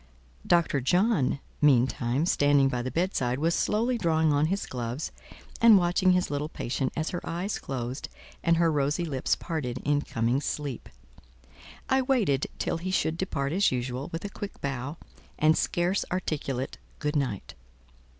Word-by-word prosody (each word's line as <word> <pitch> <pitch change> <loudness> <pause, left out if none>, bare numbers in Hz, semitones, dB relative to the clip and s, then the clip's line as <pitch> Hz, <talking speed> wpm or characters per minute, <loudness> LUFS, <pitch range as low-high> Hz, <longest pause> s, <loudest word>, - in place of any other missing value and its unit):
Dr. 170 -5 +3
John, 175 - +2 0.2
meantime, 130 0 +3
standing 145 -4 +4
by 125 -2 -2
the 130 - -3
bed 180 +7 0
side, 125 0 0
was 165 +4 +1
slowly 235 +6 +1
drawing 160 -4 +2
on 145 +2 +3
his 195 +4 -1
gloves 125 +3 -4 0.5
and 230 -3 +8
watching 180 +1 +3
his 180 -4 +1
little 145 +1 -2
patient, 130 -2 -2
as 155 0 -2
her 175 - -3
eyes 180 +5 -3
closed 125 -1 -5 0.3
and 170 -1 +3
her 165 -1 +3
rosy 150 +3 0
lips 135 -5 0
parted 145 -8 -4
in 145 0 +2
coming 120 +1 0
sleep. 145 -5 -4 1.0
I 265 0 +3
waited 230 - +1
till - - -1
he 185 +3 -4
should 165 -3 +1
depart 140 -6 -2
as 195 +4 +3
usual, 125 +3 -3
with 165 +4 -5
a - - -3
quick 200 0 -7
bow 140 +2 -4 0.4
and 155 +1 +4
scarce 175 +3 +1
articulate 145 -7 -3 0.2
"good 150 0 -2
night.". 130 -9 -2
150 Hz, 160 wpm, -27 LUFS, 135-175 Hz, 1.0 s, and